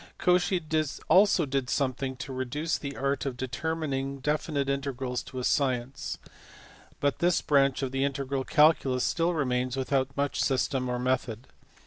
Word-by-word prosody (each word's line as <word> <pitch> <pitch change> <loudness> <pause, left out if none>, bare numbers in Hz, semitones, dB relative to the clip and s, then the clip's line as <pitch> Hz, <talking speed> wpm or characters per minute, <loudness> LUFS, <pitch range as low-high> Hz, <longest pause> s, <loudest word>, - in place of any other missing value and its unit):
Cauchy 180 +1 +2 0.5
also 190 -4 +5
did 135 -2 -2
something 130 -1 -1
to 130 +1 -7
reduce 140 +5 -2
the 140 -1 -5
art 140 +1 -1
of 125 -2 -4
determining 140 0 -2
definite 150 0 -1
integrals 135 -2 -2
to 130 - -10
a 125 - -3
science, 130 -1 -1 0.8
but 140 -1 0
this 175 0 +3
branch 140 -2 +3
of 130 - -2
the 135 0 0
integral 140 -1 -1
calculus 145 -4 +3
still 170 +1 +1
remains 125 -3 0
without 135 0 -1
much 140 0 0
system 130 -1 0
or 125 - -1
method. 125 -2 -1
135 Hz, 145 wpm, -28 LUFS, 130-145 Hz, 0.8 s, also